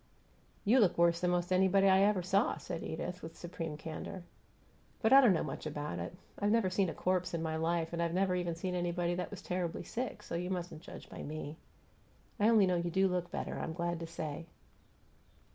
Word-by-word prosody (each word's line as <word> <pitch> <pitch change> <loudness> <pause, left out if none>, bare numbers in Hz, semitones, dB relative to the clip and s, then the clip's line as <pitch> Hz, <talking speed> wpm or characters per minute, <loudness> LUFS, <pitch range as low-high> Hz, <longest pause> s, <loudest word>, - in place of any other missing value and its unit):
"You 235 +6 +5
look 200 -7 +4
worse 170 0 +4
than 180 - +1
'most 175 +1 +1
anybody 190 +1 +4
I 190 0 +6
ever 200 -2 +3
saw," 195 +5 +2
said 165 - -5
Edith, 180 +3 -4
with 165 - -9
supreme 165 -3 -5
candor. 165 +3 -6 0.8
"But 220 +2 +4
I 275 - +10
don't 245 -6 +6
know 170 - +2
much - - -5
about 150 0 -4
it. - - -5 0.2
I've 205 - +2
never 215 -4 +3
seen 190 -1 +2
a - - -4
corpse 180 -1 0
in 165 - -2
my 160 -1 -1
life, 165 +1 0
and 170 - -1
I've 170 -1 +1
never 190 0 +2
even 175 -2 -1
seen 180 +2 -3
anybody 175 0 0
that 180 +1 -3
was 200 -2 -9
terribly 180 -2 -2
sick, 250 +1 -4
so - - -8
you 175 +2 -2
mustn't 175 -4 -4
judge - - -10
by - - -8
me. 155 0 -6 0.8
I 210 +2 +5
only 220 -4 +6
know 180 -1 +2
you 170 0 -1
do 190 +3 +3
look 180 -1 -1
better, - - -4
I'm 160 - -3
glad 170 0 -2
to 165 - -5
say. 165 -1 -5
175 Hz, 215 wpm, -33 LUFS, 165-190 Hz, 0.8 s, I